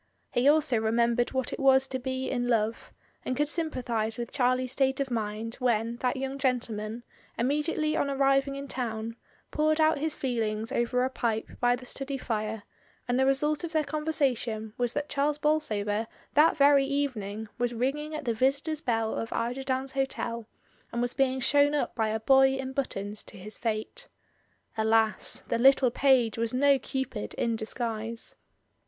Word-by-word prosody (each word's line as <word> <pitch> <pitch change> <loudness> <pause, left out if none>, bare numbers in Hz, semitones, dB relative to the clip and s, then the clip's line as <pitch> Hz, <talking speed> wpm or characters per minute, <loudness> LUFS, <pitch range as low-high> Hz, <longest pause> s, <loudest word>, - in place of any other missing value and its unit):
He 245 +3 +2
also 295 -6 +3
remembered 235 +2 +1
what 260 -1 -2
it - - -5
was 265 -1 +5
to 260 - -3
be 260 +1 -3
in 245 -1 -1
love, 225 -1 0 0.3
and 255 - -2
could 295 - +2
sympathise 245 -9 -2
with 235 -1 -5
Charlie's 255 -1 +1
state 265 0 +1
of 275 -2 -2
mind 220 0 -3
when 235 -2 0
that 250 +1 -1
young 270 +1 -4
gentleman, 235 -4 -2 0.3
immediately 300 +4 0
on 280 - 0
arriving 275 0 +2
in 280 0 -6
town, 230 -3 -3 0.4
poured 310 +1 +1
out 315 -2 +4
his 310 +1 -1
feelings 225 -3 -2
over 250 0 +1
a - - -1
pipe 225 -4 -2
by 245 0 +3
the 250 +1 -11
study 275 +2 -4
fire; 215 -3 -3 0.4
and 245 +1 +1
the 265 - +3
result 295 +3 +1
of 340 -1 -5
their 310 -1 +2
con 305 +1 -4
versation 240 -8 -1
was 245 -1 0
that 290 - -2
Charles 290 +1 0
Bolsover 225 -9 0 0.3
that 305 +3 +5
very 280 -1 +6
even 280 -4 -1
ing 205 +2 -6
was 245 0 +1
ringing 295 +6 -2
at 305 -2 -5
the 235 - +1
visitors' 275 +6 0
bell 225 -4 0
of 225 - -4
Eiderdown's 260 +3 -2
Hotel, 235 -4 -3 0.4
and 235 - -3
was 245 0 0
being 265 -1 +1
shown 285 +3 +3
up 290 - -1
by 220 -2 0
a 220 +1 -1
boy 265 +3 +5
in 265 0 -4
but 275 -1 -1
tons 205 +2 -4
to - - -11
his 210 +3 -6
fate. 230 - -3 0.7
Alas! 220 0 +2
the 230 - 0
little 265 0 +5
page 245 -4 +3
was 230 +1 -1
no 280 +1 +4
cupid 260 - -4
in 230 -1 0
disguise. 225 0 -4
255 Hz, 175 wpm, -28 LUFS, 225-275 Hz, 0.7 s, very